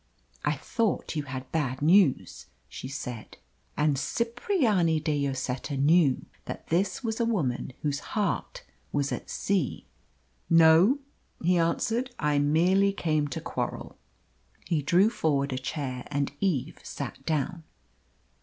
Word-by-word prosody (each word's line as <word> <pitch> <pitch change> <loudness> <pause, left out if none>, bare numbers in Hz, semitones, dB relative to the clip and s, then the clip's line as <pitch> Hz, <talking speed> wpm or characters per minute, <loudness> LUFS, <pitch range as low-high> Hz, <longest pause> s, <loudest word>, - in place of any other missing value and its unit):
"I - - +2
thought 225 -7 -1
you 150 - 0
had 130 -1 -7
bad 140 -4 -1
news," 170 -3 +3 0.2
she 60 - -8
said. 125 -5 -7 0.4
And 150 -2 +2
Cipriani 230 - +1
de 145 -2 0
Lloseta 135 +1 -3
knew 145 -1 +3 0.2
that - - -7
this 195 +10 0
was 225 -1 -2
a 235 - +2
woman 140 - -1
whose 145 -1 0 0.2
heart 205 -4 -1 0.3
was 140 -1 0
at - - -5
sea. 190 -9 -1 0.6
"No," 165 - +6 0.5
he 175 +1 +3
answered; 230 +9 0
"I 150 -1 +1
merely 180 +7 +3
came 155 -5 0
to 140 - -4
quarrel." - - -4 0.7
He 165 -3 0
drew 180 +9 +4
forward 140 - 0
a 130 - -2
chair, 130 -2 -4
and 140 -1 -1
Eve 160 -7 -1
sat 135 -1 -7
down. 160 +2 -1
155 Hz, 130 wpm, -28 LUFS, 140-190 Hz, 0.7 s, No